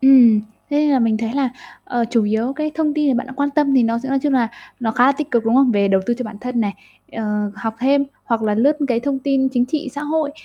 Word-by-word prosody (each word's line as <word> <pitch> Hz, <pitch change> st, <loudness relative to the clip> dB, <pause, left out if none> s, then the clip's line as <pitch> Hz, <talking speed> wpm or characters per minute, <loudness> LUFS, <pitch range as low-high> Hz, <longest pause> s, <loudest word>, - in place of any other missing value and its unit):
Ừm, 250 Hz, -5 st, +7 dB, 0.3 s
thế 290 Hz, -, 0 dB
nên 300 Hz, 0 st, +3 dB
là 270 Hz, -, +3 dB
mình 225 Hz, -2 st, +2 dB
thấy 225 Hz, 0 st, -3 dB
à, 270 Hz, -3 st, +1 dB, 0.3 s
ờ, 240 Hz, -1 st, -1 dB
chủ 230 Hz, -3 st, +2 dB
yếu, 220 Hz, +5 st, 0 dB
cái, 305 Hz, +2 st, -3 dB
thông 310 Hz, -2 st, 0 dB
tin 300 Hz, -1 st, +1 dB
mà -, -, 0 dB
bạn 250 Hz, -, -4 dB
đang 265 Hz, 0 st, -11 dB
quan 285 Hz, 0 st, 0 dB
tâm 285 Hz, -1 st, +1 dB
thì 260 Hz, -, +5 dB
nó 230 Hz, 0 st, +1 dB
sẽ 265 Hz, -, -6 dB
nói 275 Hz, 0 st, +1 dB
chung 285 Hz, +1 st, -1 dB
là 245 Hz, -4 st, +2 dB, 0.3 s
nó 225 Hz, -2 st, 0 dB
khá 245 Hz, +3 st, +3 dB
là 275 Hz, -, +5 dB
tích 295 Hz, +1 st, -5 dB
cực, 235 Hz, -2 st, +1 dB
đúng 225 Hz, +1 st, +2 dB
không? 265 Hz, -1 st, +5 dB
Về 200 Hz, -3 st, +2 dB
đầu 195 Hz, -1 st, +3 dB
tư 240 Hz, -, +1 dB
cho 250 Hz, -, -3 dB
bản 215 Hz, -2 st, -8 dB
thân 250 Hz, -1 st, -2 dB
này, 205 Hz, -2 st, -1 dB, 0.4 s
ờ, 210 Hz, -2 st, -2 dB
học 225 Hz, 0 st, -4 dB
thêm, 280 Hz, +2 st, +3 dB, 0.2 s
hoặc 230 Hz, -1 st, -1 dB
là 210 Hz, -1 st, +1 dB
lướt, 275 Hz, +8 st, +3 dB
cái, 235 Hz, -2 st, +1 dB
thông 275 Hz, +1 st, -2 dB
tin 265 Hz, 0 st, +1 dB
chính 245 Hz, -1 st, +1 dB
trị 290 Hz, +1 st, -3 dB
xã 290 Hz, -, -5 dB
hội 300 Hz, 0 st, -1 dB
250 Hz, 295 wpm, -19 LUFS, 225-280 Hz, 0.4 s, Ừm